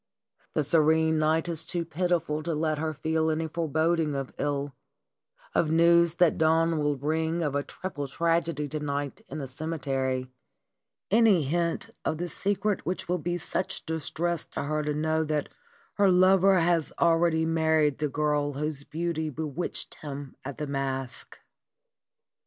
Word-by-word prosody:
The 155 - +2
serene 160 +1 +3
night 160 +2 +2
is 165 -2 0
too 170 -1 -2
pitiful 165 -2 0
to 165 0 -2
let 155 -1 0
her 160 0 -1
feel 160 +1 0
any 160 +1 -1
foreboding 160 -1 0
of 135 -1 -4
ill, 145 -1 -1 0.8
of 160 - +2
news 170 +1 +5
that 175 -2 +3
dawn 160 0 +3
will 145 -1 +1
bring 160 +4 -1
of 145 -3 -1
a 145 - +1
triple 145 -2 -6
tragedy 165 0 0
to 155 - -3
night 145 -1 -3
in - - -5
the 140 - -4
ceme 155 +6 -4
tery, 130 -2 -1 0.8
any 215 -6 +5
hint 170 +4 -1
of 155 - -1
the 175 +2 -3
secret 205 +4 -1
which 180 - -3
will 180 +1 0
be 175 +3 -2
such 180 +1 -3
distress 160 +1 -2
to - - -5
her 155 +2 -1
to 150 0 -2
know 160 +1 +1
that 150 -1 -1 0.5
her 200 -1 +5
lover 190 +1 +5
has 165 -2 +2
already 165 -1 +3
married 160 -2 +2
the 150 -1 0
girl 145 0 0
whose 145 0 -3
beauty 160 0 -2
be 155 +2 -5
witched 155 +3 -3
him 140 -2 -7
at 140 0 -6
the 150 - -3
masque. 135 -2 -4
160 Hz, 160 wpm, -27 LUFS, 145-170 Hz, 0.8 s, news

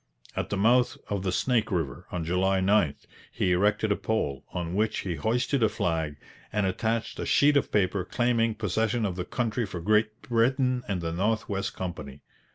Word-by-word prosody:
At - - -2
the 100 - -1
mouth 120 +5 +3
of 100 -2 -1
the 95 -1 -1
Snake 120 +4 +1
River, 80 -7 -2
on 90 -2 -2
July 95 +3 +2
9, 95 -6 +3 0.4
he 90 - 0
erected 105 +4 +2
a - - +4
pole, 75 -14 -2
on 85 -1 -3
which 110 +2 0
he 90 - -3
hoisted 120 - 0
a 110 - +4
flag 80 -4 -1 0.4
and 105 -1 +1
attached 110 +4 -1
a - - -2
sheet 145 +1 +4
of 140 - +2
paper 100 -2 +1
claiming 115 +1 +1
possession 110 +2 0
of 95 -3 -2
the 90 -1 -4
country 120 +2 -1
for 95 -3 -6
Great 110 +4 +1
Britain 125 +2 +2
and 95 -4 -2
the 80 -1 -2
North 105 +5 0
West 100 -1 -3
Company. 75 -7 -6
105 Hz, 185 wpm, -27 LUFS, 90-115 Hz, 0.4 s, a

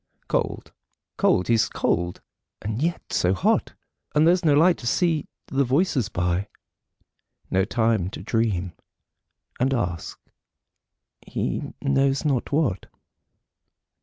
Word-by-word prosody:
Cold; - - -2 0.4
cold; 90 - +3
he's 115 -2 +3
cold; 85 0 -1 0.4
and 110 +4 -4
yet 170 +2 -2
so 90 +2 +2
hot: 90 - +1 0.4
And 150 +1 +5
there's 180 +1 +4
no 150 -3 +4
light 170 +4 +4
to 120 - -5
see 160 +3 +1 0.2
the 140 +1 +1
voices 135 - +1
by 90 +3 -1 1.0
No 95 0 +2
time 110 -5 +1
to - - -8
dream, 100 -6 0 0.9
and 135 +2 +2
ask 90 -8 -3 1.0
he - - -3
knows 140 0 +2
not 135 -5 0
what. 140 - 0
120 Hz, 115 wpm, -24 LUFS, 95-145 Hz, 1.0 s, And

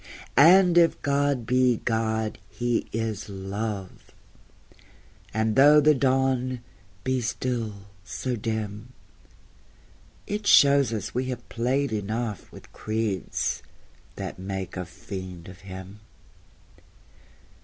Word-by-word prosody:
And 175 +5 +7
if 165 -1 +3
God 140 -3 +1
be 125 0 +3
God, 110 -1 -1
He 120 -1 -1
is 110 -2 -3
Love; 100 0 -5 1.2
And 110 0 0
though 145 +3 +7
the 150 +1 +5
Dawn 130 -2 +1 0.4
be 130 -1 0
still 115 -4 -3 0.2
so 125 +5 -3
dim, 110 +1 -4 1.3
It 205 0 -3
shows 140 -3 +6
us 105 -3 -4
we 125 +2 -1
have 130 -1 -5
played 125 +2 0
enough 110 -1 -3
With - - -14
creeds 110 -3 -2 0.5
that - - -6
make 95 -1 -5
a 90 -1 -4
fiend 90 -1 -8
of 90 0 -11
Him. 95 +1 -10
115 Hz, 105 wpm, -26 LUFS, 100-130 Hz, 1.3 s, And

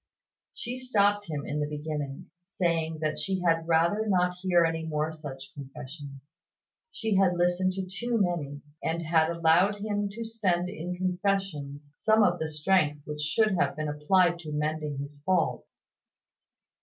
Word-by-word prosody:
She 245 +2 -4
stopped 205 -5 +2
him 145 -2 -3
in 150 - -2
the 150 - 0
beginning, 150 -2 -5
saying 170 -3 -1
that 155 -1 -1
she 190 -1 -1
had 165 -1 +2
rather 170 +7 +3
not 180 -2 +2
hear 175 -2 +4
any 165 0 -1
more 155 0 -1
such 140 -4 -9
confessions. 140 +1 -10 0.5
She 220 - -1
had 190 -2 +4
listened 180 +1 +2
to 190 0 -3
too 230 +6 -2
many, 155 -7 -1 0.2
and 170 +1 -1
had 160 0 +3
allowed 170 +4 +4
him 205 0 -2
to 230 +2 -5
spend 190 -6 0
in 180 -1 -5
confessions 180 -6 -2
some 220 0 +4
of 175 -3 +2
the 160 - -2
strength 150 -2 +1
which 150 0 -5
should 215 +8 +2
have - - +1
been 155 0 -2
applied 170 +4 +3
to 155 -3 -7
mending 150 -1 -2
his 140 +1 -7
faults. 185 -2 0
170 Hz, 155 wpm, -28 LUFS, 150-190 Hz, 0.5 s, hear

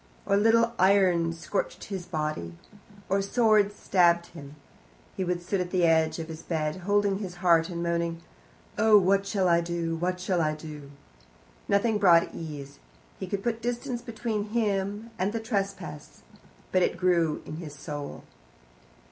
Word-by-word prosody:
Or 200 - +2
little 230 +3 +4
irons 180 -3 +3
scorched - - -3
his 190 -3 -6
body. 150 - -3 0.5
Or 195 - +1
a - - +1
sword 210 -1 +3
stabbed 170 -4 +2
him. 145 -3 -11 0.6
He 190 - -2
would 175 -1 -2
sit 190 +1 -1
at 180 - -3
the 180 -2 +2
edge 160 -1 +3
of 165 -1 -5
his 160 0 -8
bed, 155 -1 -2
holding 200 +1 +1
his 185 -4 -6
heart 170 -1 +3
and 170 -1 -4
moaning, 170 -1 -1 0.6
"Oh 215 0 +7
what 195 +1 +3
SHALL 195 -2 +1
I 170 -1 +4
do, 170 -1 -2
whatever 180 +2 -2
SHALL 180 -1 0
I 155 -1 0
do?" 150 -2 -9 0.8
Nothing 210 +2 +2
brought 170 -4 +5
ease. 145 -4 -8 0.4
He - - -5
could 195 -1 -3
put 230 -1 -1
distance 240 +1 -3
between 225 -3 -3
him 205 0 -1
and 195 +3 0
the 230 - -1
trespass, 200 -3 -4 0.5
but 185 - +3
it - - +1
grew 170 -4 +1
in 155 - -7
his 155 -3 -8
soul. 145 0 -7
180 Hz, 165 wpm, -27 LUFS, 165-205 Hz, 0.8 s, Oh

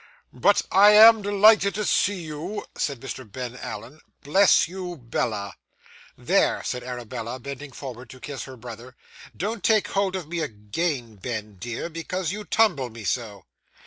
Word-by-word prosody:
'But - - +3
I 205 +2 +7
am 220 +1 +9
delighted 205 0 +5
to 210 0 -1
see 190 -2 +1
you,' 160 +7 -5
said 140 -4 -2
Mr. 130 -4 -7
Ben 125 +1 -6
Allen. 130 +3 -8 0.2
'Bless 190 +7 +5
you, 180 -1 -6
Bella!' 115 -4 -3 0.6
'There,' - - +2
said 125 0 -3
Arabella, 120 -1 -6
bending 140 +2 -8
forward 125 -2 -9
to 130 - -12
kiss 140 0 -6
her 130 -1 -11
brother; 120 +2 -10 0.4
'don't 205 +1 -3
take 215 -2 +3
hold 195 -1 0
of 180 -5 -5
me 170 +1 -3
again, 120 -1 -3
Ben, 105 -1 -5
dear, 120 - -5
because 170 +1 -3
you 210 +2 -5
tumble 180 - +2
me 115 -1 -10
so. 105 -2 -3
140 Hz, 155 wpm, -25 LUFS, 120-190 Hz, 0.6 s, am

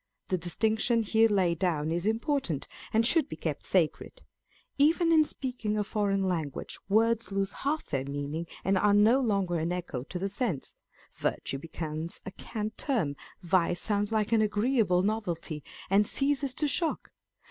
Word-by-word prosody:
The 185 - +1
distinction 220 +6 +1
here 225 +1 +4
laid 180 -5 +2
down 160 -4 0
is 170 +4 -1
important, 225 - 0 0.3
and 225 +1 +3
should 310 +3 +3
be - - -5
kept - - -4
sacred. - - 0 0.6
Even 330 +4 +4
in 315 -1 +6
speaking 250 -7 -3
a 210 - +1
foreign 200 -2 0
language, 160 -6 -3
words 225 +1 +2
lose 195 0 0
half 300 +3 -2
their 135 -3 -2
meaning, 145 +4 -4 0.2
and 190 0 +3
are 205 0 +4
no 220 +5 +5
longer 195 -8 0
an 165 +2 -1
echo 175 -8 -3
to 155 +7 -6
the 190 +2 -1
sense; 200 - -2 0.4
virtue 135 - -2
becomes 160 +1 -5
a 195 - -5
cant 215 +2 -5
term, 210 - 0 0.3
vice 175 0 +2
sounds 205 0 0
like 215 -1 0
an 225 -1 +4
agreeable 210 -3 +2
novelty, 175 -7 -2 0.2
and 200 +2 +3
ceases 275 -2 0
to 300 - +1
shock. 320 +2 -1
205 Hz, 160 wpm, -29 LUFS, 175-230 Hz, 0.6 s, in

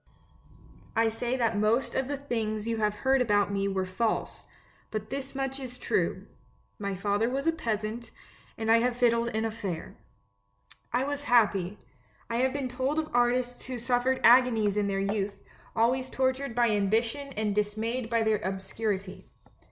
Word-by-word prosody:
I 225 0 +4
say 240 +3 -2
that 230 -3 +1
most 220 +5 +2
of 265 -1 0
the 285 0 -2
things 220 -5 -2
you 230 -1 0
have 210 -1 +1
heard 265 0 +4
about 205 -4 +2
me 195 0 0
were 190 -1 -1
false, 200 +5 -2 0.4
but 215 0 -5
this 275 0 -5
much 270 0 -2
is 250 -2 -6
true - - -1 0.3
— - - -38
my 200 -1 -2
father 205 +4 +1
was 270 +2 -2
a 330 - +4
peasant, 225 -5 -3 0.5
and 225 0 0
I 230 - +7
have 245 +1 +1
fiddled 235 -1 +3
in 220 -1 -1
a 225 - -1
fair. 200 -7 -5 1.0
"I 245 +2 +1
was 285 +1 -2
happy. 210 -5 +3 0.5
I 230 - 0
have 260 +2 +2
been 275 -1 -2
told 260 +4 -1
of 315 -1 -1
artists 245 0 +1
who 255 -1 -4
suffered 245 +2 +1
agonies 230 -4 +5
in 205 -1 +1
their 195 -1 -1
youth, 200 0 -1 0.4
always 255 +3 +2
tortured 260 -1 -1
by 240 -2 +3
ambition 225 +7 +1
and 210 -2 -1
dismayed 220 +3 -1
by 230 -1 +2
their 220 -1 +2
obscurity. 190 0 -4
230 Hz, 170 wpm, -28 LUFS, 210-255 Hz, 1.0 s, I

